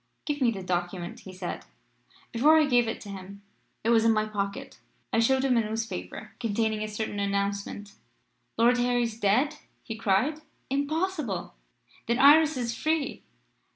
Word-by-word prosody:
"'Give 290 -2 -2
me 250 - +4
the 195 -5 -4
document,' 175 0 -3
he 190 - -11
said. 180 -1 -6 0.7
"Before 295 +7 +5
I 310 - +5
gave 245 -4 +3
it 225 - -3
to 205 - -9
him 200 +1 -9 0.4
it 225 - +1
was 225 -1 +5
in 230 - +5
my 215 -1 +2
pocket 200 -2 -4 0.3
I - - +3
showed 265 +3 +3
him 255 -2 +3
a - - +4
newspaper 220 -1 -5
containing 220 -1 0
a 215 - -2
certain 210 -1 -4
announcement. 200 0 -2 0.6
"'Lord 240 +2 +4
Harry 245 0 +2
dead?' 230 +7 +1 0.3
he 225 - -6
cried. 225 +9 +1 0.3
'Impossible! 295 - -1 0.5
Then 235 +1 +1
Iris 300 +2 +6
is 235 -2 -2
free.' 310 -3 -1
225 Hz, 155 wpm, -27 LUFS, 200-265 Hz, 0.7 s, Iris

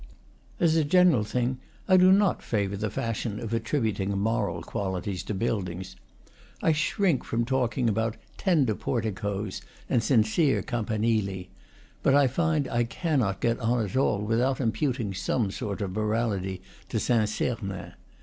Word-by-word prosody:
As 165 -2 +3
a 160 - +3
general 170 -6 +4
thing, 125 +4 -1 0.3
I 185 - +6
do 185 0 +7
not 195 0 +3
favor 100 -3 -1
the 105 +2 -2
fashion 115 0 -3
of 115 -1 -5
attributing 110 -5 -1
moral 110 +3 -1
qualities 95 -1 -3
to 105 - -3
buildings; 95 -3 -3 0.6
I 160 - +3
shrink 160 0 +1
from 115 +1 -1
talking 125 -1 0
about 110 +1 0 0.2
tender 150 - +2
porticos 105 -3 -3 0.3
and 120 - +2
sincere 130 +5 +2
campanili; 110 -5 -1 0.5
but 140 - +4
I 145 -1 +6
find 155 +1 +1
I 120 -1 +1
cannot 120 - -1
get 115 0 +1
on 115 -1 +1
at 100 - -7
all 105 -6 +2
without 120 +5 +1
imputing 120 -2 -1
some 95 +3 -1
sort 100 +1 -4
of 95 - -3
morality 105 -3 -1 0.3
to 110 - -1
Saint 110 -2 +2
Sernin. 100 -6 -3
115 Hz, 145 wpm, -27 LUFS, 100-130 Hz, 0.6 s, do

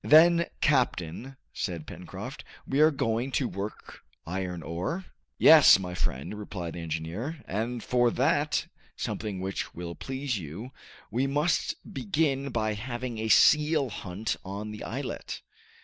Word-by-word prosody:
"Then, 170 +2 +7
captain," 130 - +1 0.2
said 85 -5 -3
Pencroft, - - -8 0.2
"we 135 - 0
are 155 +1 +8
going 125 -3 -1
to 130 - +1
work 100 0 -6 0.3
iron 90 -1 -3
ore?" 90 - -3 0.3
"Yes, 155 -9 +9
my 90 -2 -5
friend," 70 -2 -2
replied 90 -5 -5
the - - -6
engineer, 85 - -4
"and 115 +5 -2
for 120 -1 +3
that 145 +4 +1 0.3
something 105 -3 -3
which 95 +1 -4
will 85 0 -5
please 130 +1 -3
you 90 - -7 0.4
we 125 +5 +1
must 150 +5 +1 0.2
begin 135 +3 0
by 110 -3 0
having 120 +1 -4
a 110 - -1
seal 150 +5 +5
hunt 100 +2 -3
on 100 +3 -5
the 105 - -7
islet." - - -5
115 Hz, 135 wpm, -28 LUFS, 95-135 Hz, 0.4 s, Yes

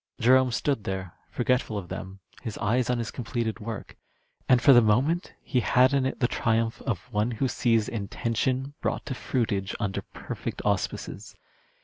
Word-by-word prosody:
Jerome 130 +2 +5
stood 135 -1 0
there 95 -2 -4 0.2
forgetful 125 -3 0
of 90 -3 -6
them, 95 +1 -7 0.2
his 110 -4 -5
eyes 120 +4 +1
on 125 - +2
his 115 -2 -3
completed 115 -2 -3
work, 110 -1 -6 0.5
and 125 -2 +7
for 135 +2 +7
the 120 - +8
moment 130 - +2
he 125 - +1
had 125 +3 +4
in 135 -1 +3
it - - -4
the 120 - +3
triumph 115 0 0
of 120 0 -3
one 105 +3 +1
who 125 +3 0
sees 115 -3 +2
intention, 120 +5 -1
brought - - -2
to 140 - -3
fruitage 110 -6 -1
under 100 -2 -1
perfect - - -6
auspices. - - -2
120 Hz, 165 wpm, -27 LUFS, 105-130 Hz, 0.5 s, the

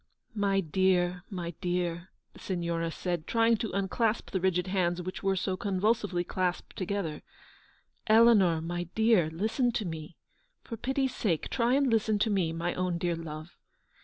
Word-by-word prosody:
" - - -44 0.2
My 195 0 +2
dear, 180 +1 +1
my 175 -4 -4
dear," 175 -1 -2 0.2
the - - -15
Signora 170 -2 -2
said, 175 -1 -3
trying 230 0 +3
to 225 - -3
unclasp 200 +4 0
the 190 - -1
rigid 180 -1 +1
hands 180 -2 0
which 185 +1 -5
were 195 -1 +1
so 185 0 -1
convul 200 +4 +1
sively 190 -6 -3
clasped 180 0 -2
together. 185 -5 -3 0.4
" - - -36
Eleanor, 200 -8 +5
my 175 +2 -3
dear, 220 -7 +4
listen 220 - 0
to 215 - -1
me; 160 -1 -7 0.5
for 230 - -6
pity's 265 +2 -1
sake 175 -11 -1
try 240 +1 +2
and 280 0 +3
listen 220 -2 +2
to 215 +2 +1
me, 185 -5 +1
my 170 +2 -2
own 180 -1 -1
dear 170 0 -1
love. 160 0 -8
185 Hz, 170 wpm, -29 LUFS, 175-215 Hz, 0.5 s, Eleanor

